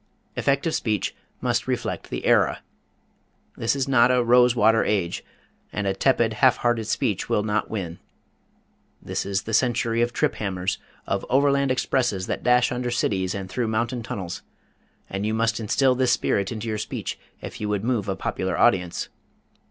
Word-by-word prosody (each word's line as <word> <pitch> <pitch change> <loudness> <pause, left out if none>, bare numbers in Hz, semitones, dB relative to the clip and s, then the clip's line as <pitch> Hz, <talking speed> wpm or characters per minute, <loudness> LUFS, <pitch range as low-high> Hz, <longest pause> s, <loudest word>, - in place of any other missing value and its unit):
Effective 140 +4 +1
speech 105 -3 -1 0.3
must - - 0
reflect - - -3
the - - -4
era. - - +3 0.9
This 115 +4 0
is 135 -1 -1
not 125 -2 +5
a 125 -1 +3
rose 125 +1 +5
water 115 0 +4
age, 95 -5 -1 0.5
and 105 - -3
a 95 - +1
tepid, 115 +1 +2
half 130 -2 +6
hearted 120 -2 0
speech 110 -3 -1
will 105 - +2
not 105 0 -1
win. 90 -6 -4 1.0
This - - -4
is 100 -1 -1
the 115 - -6
century 115 -1 +2
of 120 0 +1
trip - - +1
hammers, 95 -2 -2 0.3
of - - -1
overland 140 +1 +3
expresses 125 -7 0
that - - -3
dash 125 0 +3
under 125 0 -2
cities 95 -6 0
and 95 -1 -5
through 115 +5 -2
mountain 115 +2 -1
tunnels, 100 -7 -5 0.7
and 95 +1 -4
you 110 +1 0
must 115 +1 +1
instill 130 +4 +2
this 130 -1 +2
spirit 100 -3 0
into 115 0 -5
your 110 -1 -2
speech 110 - -4 0.2
if - - -8
you 105 - -2
would 105 -1 -1
move 115 -4 0
a 95 - 0
popular 95 -1 -2
audience. 90 -7 +2
115 Hz, 170 wpm, -24 LUFS, 100-125 Hz, 1.0 s, half